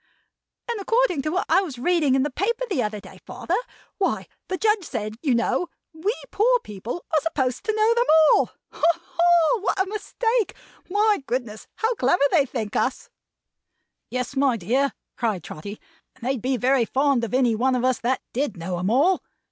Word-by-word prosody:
"And 470 -2 -2
according 455 - +2
to 305 - -2
what 365 +4 -1
I - - +4
was 310 -10 -6
reading 300 0 +2
you - - +4
in 265 - +2
the 295 - -2
paper 450 - -1
the 370 - 0
other 210 -1 -2
day, - - -14
father; - - -5 0.5
what 390 - 0 0.2
the 370 - -2
Judge 425 -1 +2
said, 215 -8 -4
you 275 -6 +2
know; 240 +9 0 0.3
we 325 +6 -1 0.2
poor - - +3
people 215 - -7
are 310 - +4
supposed 265 -6 -1
to 435 - 0
know 435 +1 +4
them 475 +1 +2 0.3
all. - - +4 0.3
Ha, - - -14
ha! 345 +4 +2
What 400 -1 -1
a 380 - +3
mistake! 450 +2 -1 0.3
My 415 -1 +2
goodness 235 -4 -4
me, - - -49
how 450 +2 0
clever 275 - +2
they 285 -5 +3
think 225 -5 -4
us!" 255 - -1 1.0
"Yes, 250 +2 -3
my 270 -3 +2
dear," 255 +9 0 0.2
cried 215 -8 -1
Trotty; 200 +7 -8 0.4
"and 260 - -19
they'd 260 -2 -1
be 255 +1 0
very 255 +1 +2
fond 270 0 +1
of 230 +1 -2
any 250 -3 +3
one 255 +4 +1
of 250 0 0
us 255 -1 +2
that 250 +2 -1
did 250 -5 -1
know 175 +1 -4
'em 185 +2 -1
all. 305 - +3
275 Hz, 195 wpm, -24 LUFS, 240-380 Hz, 1.0 s, I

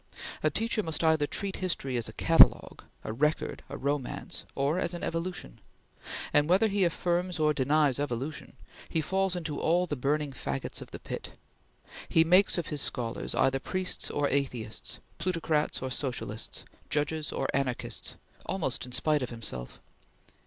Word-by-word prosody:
A 155 - +3
teacher 225 +7 0
must 160 -3 -1
either 160 -2 +4
treat 195 +4 -2
history 165 -8 -1
as 115 -2 0
a - - -10
catalogue, 165 +7 +5 0.2
a 110 - -4
record, 150 +6 0
a - - -5
romance, 140 -1 -3
or 145 +6 +1
as 175 -1 -1
an 175 - -6
evolution; 165 - -4 0.7
and 145 +2 +4
whether 195 +5 +5
he 200 -2 +1
affirms 175 +1 0
or 155 -1 +3
denies 145 0 +3
evolution, 140 +1 -3 0.4
he 165 - +1
falls 190 +3 +1
into 160 -4 -3
all 175 +2 +3
the 150 - -3
burning 145 +2 0
faggots 70 - -4
of - - -9
the - - -7
pit. - - -6 0.8
He 160 - +5
makes 180 +4 +5
of 170 - -1
his 150 -2 -2
scholars 115 -2 -2
either 135 0 +3
priests 185 +6 -1
or 145 -1 +1
atheists, 125 -6 -2 0.2
plutocrats 165 -5 0
or 130 - -3
socialists, 120 -4 -3 0.2
judges 150 +1 0
or 135 - -1
anarchists, 135 -3 -1 0.3
almost 155 -9 -1
in - - -10
spite 150 +3 +2
of 125 - -2
himself. 105 - -4
150 Hz, 160 wpm, -29 LUFS, 135-175 Hz, 0.8 s, catalogue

